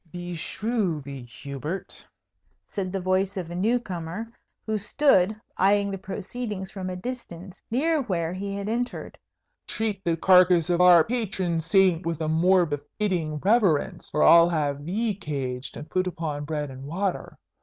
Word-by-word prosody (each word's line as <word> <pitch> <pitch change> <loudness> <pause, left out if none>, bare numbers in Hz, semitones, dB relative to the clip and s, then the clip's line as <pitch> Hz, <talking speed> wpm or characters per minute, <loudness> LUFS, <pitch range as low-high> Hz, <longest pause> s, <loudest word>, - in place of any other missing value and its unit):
"Beshrew 175 - -2
thee, 135 -2 -8 0.2
Hubert!" 140 +6 -6 0.6
said 190 -3 -4
the 195 - -2
voice 185 +1 0
of 175 -2 -4
a - - -5
new 225 +7 +2
comer, 185 +1 -6 0.3
who 220 -1 -1
stood 210 -3 +3 0.2
eyeing 200 +1 +3
the 195 - -4
proceedings 200 0 -5
from 190 -2 -5
a 180 - -4
distance, 190 -4 -7
near 305 +6 +1
where 175 -8 -2
he 195 +1 -4
had 200 0 -4
entered; 240 +3 -3 0.5
"treat 210 -3 -2
the 165 -1 0
carcase 180 -1 +5
of 175 0 +2
our 175 -2 +8
patron 190 -7 -1
saint 180 +1 +3
with 165 -2 -3
a 160 - -2
more 175 +3 +4
befitting 155 +2 -2
reverence, 195 -7 +2
or 150 - +2
I'll 170 0 +7
have 145 -3 -1
thee 215 +4 0
caged 135 -8 -5
and 150 - -8
put 185 +2 0
upon 160 -5 -4
bread 150 -2 -3
and 130 +1 -9
water. 185 +5 -3
185 Hz, 155 wpm, -25 LUFS, 165-200 Hz, 0.6 s, our